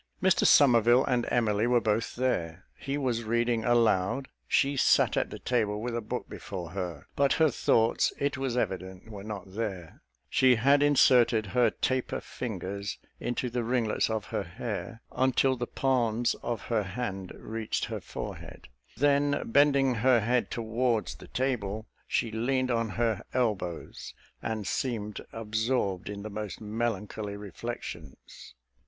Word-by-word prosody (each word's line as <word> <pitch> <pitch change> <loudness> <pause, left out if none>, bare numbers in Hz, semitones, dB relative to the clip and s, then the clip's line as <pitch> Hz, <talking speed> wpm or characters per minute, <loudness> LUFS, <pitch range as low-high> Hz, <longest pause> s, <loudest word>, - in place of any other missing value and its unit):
Mr 185 -1 +3
Somerville 120 -2 +6
and 125 -2 0
Emily 110 -2 +2
were 120 0 +4
both 110 0 -1
there. 95 -9 -1
He 140 +1 -3
was 125 -5 -1
reading 120 0 +1
aloud; 120 +1 +2 0.2
she 140 +1 +2
sat 135 - +4
at - - 0
the - - -7
table 105 -4 0
with 120 +1 -3
a 120 - -1
book 105 - -4
before 90 -4 -7
her: 90 -5 -5
but 140 -1 +3
her 160 -2 +3
thoughts, 115 -1 +2
it 140 0 0
was 130 -2 -2
evident, 95 0 -3
were 100 -2 -8
not 100 -3 -7
there; 95 -6 -5 0.3
she 130 - +4
had 140 +5 +4
inserted 125 -6 +5
her 125 -2 +4
taper 130 +4 -1
fingers 100 -3 -5 0.2
into 120 +1 -2
the 120 0 -2
ringlets 115 -2 +1
of 110 -2 -2
her - - 0
hair, 110 +5 -6
until 130 0 +2
the 120 -1 -4
palms 120 -3 +1
of 120 -3 -3
her 115 -3 0
hand 95 -2 -4
reached 110 0 -3
her - - -5
forehead; - - -8 0.3
then, 145 0 +2
bending 140 -1 +4
her 120 +1 +4
head 120 +3 +1
towards 115 0 -1
the - - -13
table, 110 -5 -2 0.2
she 115 - 0
leaned 130 +3 0
on 115 -1 0
her 115 0 0
elbows, 105 -9 -2 0.3
and 110 -2 -3
seemed 105 -1 -2
absorbed 110 -3 -1
in 100 -1 -6
the 110 - -6
most 105 -1 -5
melancholy 105 -2 -3
reflections. 100 - -8
115 Hz, 150 wpm, -29 LUFS, 105-125 Hz, 0.3 s, Somerville